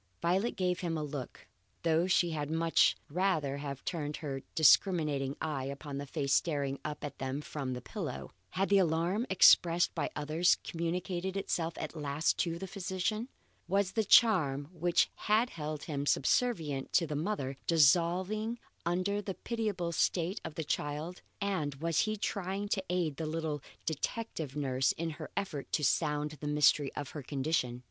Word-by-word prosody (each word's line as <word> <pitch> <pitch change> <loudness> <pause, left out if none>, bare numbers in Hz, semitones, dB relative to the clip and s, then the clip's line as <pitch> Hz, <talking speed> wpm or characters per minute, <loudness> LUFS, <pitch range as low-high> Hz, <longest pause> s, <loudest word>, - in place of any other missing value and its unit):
Violet 190 +7 +1
gave 180 -1 0
him 165 -2 -2
a 155 - -2
look, 140 -4 -6 0.4
though 165 +1 +3
she 175 -2 +3
had 150 -2 -3
much 165 +1 +3
rather 155 -5 0
have 140 -2 -6
turned 150 -3 -3
her 135 -3 -4
discriminating 150 -4 +4
eye 145 -4 -2
upon 140 +1 -5
the 140 - -6
face 140 0 -1
staring 140 -4 +1
up 150 -1 -5
at 145 - -6
them 135 +1 -2
from 140 -3 -4
the 125 0 -6
pillow. 165 - -5 0.2
Had 195 +1 -1
the 200 -1 +6
alarm 175 +7 +1
expressed 175 -2 +6
by 160 -4 -1
others 155 +4 +2
communicated 180 +3 -2
itself 165 -4 -1
at - - -5
last 150 +1 0
to 170 -1 0
the 190 - -5
physician? 195 +4 -2 0.4
Was 195 +1 +1
the 220 - +1
charm 155 - +4
which 175 0 +2 0.2
had 220 +3 +3
held 150 -1 -5
him 145 -2 -3
subservient 150 - +1
to 170 - +4
the 150 -1 -4
mother, 145 -5 -2
dissolving 180 - +3 0.3
under 185 +4 0
the 195 -2 -5
pitiable 210 -7 -2
state 170 +3 0
of 155 - -6
the 160 - -2
child, 150 +4 -3 0.2
and 185 -9 -1
was 165 +3 0
he 215 0 +1
trying 200 0 -2
to 195 -2 0
aid 175 -5 0
the 160 - -3
little 155 -2 -2 0.2
detective 160 - -3
nurse 135 -2 +1
in 165 0 -3
her 155 0 -8
effort 180 -8 -3
to 150 - +1
sound 150 +1 +1
the 150 - -3
mystery 150 -1 +3
of 145 -2 -5
her 150 - -6
condition? 135 -2 -1
165 Hz, 165 wpm, -32 LUFS, 145-185 Hz, 0.4 s, the